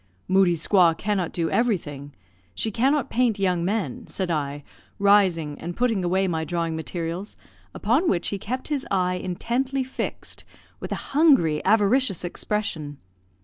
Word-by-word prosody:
"Moodie's 180 -4 +3
squaw 175 -5 +5
cannot 195 -5 -1
do 165 -2 -1
everything; 150 - -1 0.4
she 220 - -2
cannot 270 +5 +1
paint 235 -3 +2
young 180 -3 +1
men," 220 +5 -2
said 185 -3 -3
I, 145 -2 -2 0.3
rising, 185 -7 +3
and 175 +1 -6
putting 230 -6 +1
away 190 +2 +1
my 160 -3 -1
drawing 165 0 -2
materials, 170 +4 -5 0.4
upon 260 - +2
which 175 - 0
he 200 - -3
kept 255 +8 -4
his 285 -3 -2
eye 180 -1 +1
intently 255 +9 -1
fixed, 260 - -6 0.4
with - - -7
a - - 0 0.2
hungry, 270 - +4
avaricious 210 - +3
expression. 170 -6 -3
190 Hz, 145 wpm, -24 LUFS, 170-230 Hz, 0.4 s, squaw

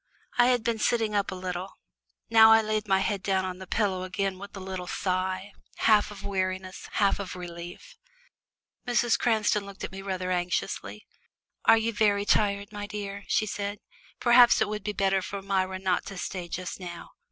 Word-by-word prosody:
I 240 - +7
had 250 -2 +2
been 230 -1 -1
sitting 225 -1 +1
up 205 -1 +1
a 190 - -4
little 185 0 -5 0.5
now 225 -1 +7
I 225 0 +5
laid 215 0 -1
my 190 -1 +3
head 200 -2 -1
down 190 -2 0
on 185 0 -5
the 190 - -9
pillows 190 -3 0
again 195 0 -2
with 200 0 -9
a - - -5
little 185 -1 -6
sigh, 185 +1 -2 0.2
half 215 -2 +4
of 200 -1 -10
weariness, 185 -1 -3
half 200 -1 +2
of 190 -2 -5
relief. 175 - -9 0.9
Mrs. 240 -1 +2
Cranston 215 -3 +2
looked 200 -1 -10
at - - -4
me 190 0 -7
rather 185 -2 -3
anxiously. 180 0 -2 0.6
"Are 225 - +7
you 225 +1 0
very 205 -1 +2
tired, 200 0 +1
my 205 -1 -6
dear?" 200 -1 -6
she 215 - +2
said. 205 0 -4 0.4
"Perhaps 240 0 +6
it 220 - +2
would 210 -1 -4
be 210 - -2
better 195 -1 +1
for 195 +1 -6
Myra 190 -1 0
not 185 -1 0
to 195 - -7
stay 180 -1 -4
just 180 +2 -5
now." 175 -2 -8
200 Hz, 185 wpm, -27 LUFS, 185-210 Hz, 0.9 s, I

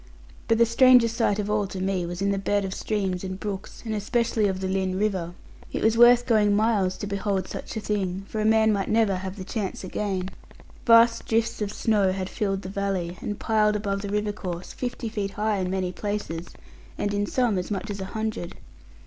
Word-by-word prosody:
But 225 - +3
the 235 - +6
strangest 235 -1 +5
sight 215 -4 +2
of 210 -1 -2
all 210 -1 0
to 190 - -6
me 185 -2 -1
was 175 +2 -4
in 200 - +2
the 195 - 0
bed 200 0 0
of 190 - -4
streams, 190 -4 -2
and 185 0 -5
brooks, 200 -1 -6
and 220 - -2
especially 220 0 +1
of 190 -1 -2
the 190 - -2
Lynn 190 -1 -1
river. 190 -4 -1 0.4
It - - -3
was 220 0 +4
worth 240 +1 +7
going 210 -4 +3
miles 210 -4 +2
to - - -5
behold 200 -2 -1
such - - -6
a - - -3
thing, 195 -2 -2
for 215 - -3
a - - 0
man 220 0 +4
might 195 -1 -1
never 215 -4 +3
have 190 +1 -5
the 190 - -7
chance 195 0 -4
again. 190 -1 -3 0.6
Vast 230 0 +6
drifts 230 0 0
of 205 -1 -1
snow 210 -4 +2
had 190 -1 -3
filled 195 -2 -2
the - - -6
valley, 195 -3 -2
and 205 - -4
piled 215 -1 +2
above 200 -1 -2
the 200 - -5
river 210 +1 0
course, 180 -4 -6
fifty 245 -1 -4
feet 205 -2 -3
high 210 0 0
in 185 -1 -1
many 185 -1 -1
places, 195 -4 -4 0.5
and 205 - -1
in 205 0 0
some 235 -6 +1
as 180 - -5
much 205 0 -3
as 200 -1 -5
a - - -3
hundred. 220 -3 -4
205 Hz, 215 wpm, -25 LUFS, 190-220 Hz, 0.6 s, worth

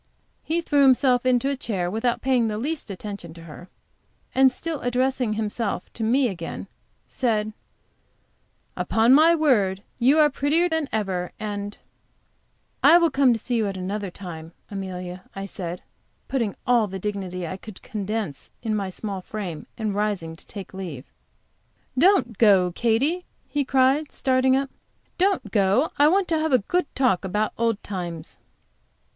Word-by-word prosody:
He 335 +2 -1
threw 290 -3 +2
himself 255 -2 +4
into 250 +1 +3
a 280 - 0
chair 190 -9 -2
without 230 +3 -1
paying 250 -3 +2
the 210 -1 -2
least 290 +5 -3
attention 195 -4 -7
to 165 - -11
her, 170 +3 -11 0.6
and 265 0 +5
still 320 +3 -4
addressing 250 -1 0
himself 215 -2 -3
to 225 - -4
me 250 +4 +3
again, 175 -6 -5 0.4
said: 215 -4 -1 1.2
"Upon 225 +3 +3
my 320 +4 +7
word, 205 - +2 0.2
you 265 +5 +4
are 300 -1 +5
prettier 295 +6 +2
than 320 -4 -1
ever," 190 -5 -2
and 205 -1 -4 1.0
"I 340 - +8
will 335 -2 +3
come 270 -2 +4
to - - -1
see 240 +2 -2
you 220 -2 +1
at 195 -1 -4
another 195 +2 -3
time, 170 -3 -9 0.2
Amelia," 185 -2 -6
I 195 0 -4
said, 180 -2 -6 0.4
putting 240 -6 0
on - - -13
all 240 -3 +3
the 190 0 -5
dignity 190 -3 -4
I 170 - -4
could 210 0 -12
condense 210 -7 -4
in 220 -2 0
my 200 -2 -2
small 195 0 -5
frame, 185 -6 -6
and 215 -3 -2
rising 200 -6 -1
to - - -19
take 200 -3 -8
leave. 170 -9 -6 0.9
"Don't 275 - +3
go, 195 -5 +5
Katy!" 245 - +1 0.2
he 290 -1 0
cried, 270 +3 +2
starting 260 0 +2
up, 275 0 -1 0.5
"don't 370 - +1
go. 205 +8 +2
I 290 - +7
want 375 +3 +3
to 325 -2 +2
have 315 -2 0
a - - +8
good 360 -4 +1
talk 250 -9 +2
about 210 +3 -1
old 230 -2 0
times." 175 -5 -6
220 Hz, 160 wpm, -24 LUFS, 190-265 Hz, 1.2 s, I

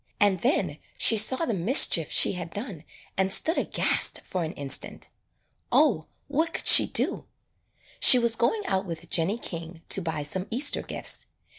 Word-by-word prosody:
And 200 -3 +1
then 260 - -2 0.2
she 225 - +3
saw 260 +9 +2
the 235 - -4
mischief 175 - +3
she - - +3
had 175 -2 -7
done 200 - -8 0.3
and 190 0 0
stood 325 - +2
aghast - - 0
for 185 -2 -6
an 160 - -7
instant. 140 -2 -2 0.6
O, 225 - +1 0.2
what 315 +4 -3
could - - -4
she - - +8
do! - - -1 0.7
She 255 - +8
was 235 -1 0
going 405 - -2
out 190 - -3
with 165 0 -9
Jennie 180 +6 -1
King 165 -5 -8
to 195 - +1
buy 160 -3 -5
some 185 +6 -3
Easter 270 +6 +2
gifts. - - -3
190 Hz, 165 wpm, -24 LUFS, 165-240 Hz, 0.7 s, she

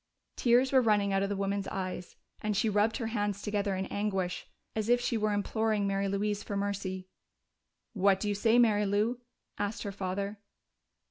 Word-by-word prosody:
Tears 250 +2 +3
were 265 -1 +6
running 205 -4 +2
out 195 - +2
of 200 - 0
the 205 - -1
woman's 195 0 -1
eyes, 185 -2 -4 0.3
and 210 -2 -1
she 220 +2 +2
rubbed 210 +2 +2
her 240 - -3
hands 205 -3 -1
together 205 -2 0
in 190 +1 -2
anguish, 195 -3 -2 0.3
as 220 0 -1
if 245 0 +5
she 245 - -1
were 215 -1 +1
imploring 210 0 0
Mary 195 0 0
Louise 205 +1 -1
for 200 - -4
mercy. 200 -2 -3 0.9
"What 195 -2 +3
do 210 - -2
you 205 - +1
say, 225 +3 +3
Mary 210 -4 +4
Lou?" 215 +5 +1 0.4
asked 205 +1 -2
her 200 - -3
father. 200 +2 -3
205 Hz, 185 wpm, -30 LUFS, 195-215 Hz, 0.9 s, were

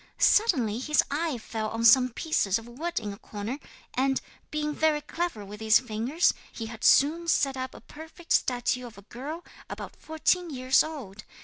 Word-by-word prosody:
Suddenly 245 - +3
his 300 +4 +2
eye 305 -2 -1
fell 220 -1 -4
on 225 +1 -2
some 255 +2 +7
pieces 235 - 0
of 225 +1 -10
wood 310 +9 -3
in 210 -3 -5
a 200 - -12
corner 215 +6 -6 0.3
and, 270 +1 +1 0.3
being 300 0 -2
very 310 -1 +2
clever 325 -11 -4
with 205 +1 -10
his 220 0 +5
fingers, 250 +7 +1 0.2
he 225 - -6
had 220 0 -9
soon 325 +5 +4
set 275 -4 +2
up 260 0 -5
a - - -12
perfect 320 +2 -12
statue 250 0 +1
of 220 -4 -14
a 200 - -13
girl 290 - -7 0.2
about - - -7
fourteen 335 +3 0
years 260 -2 +3
old. 250 -11 -8
260 Hz, 180 wpm, -27 LUFS, 225-310 Hz, 0.3 s, some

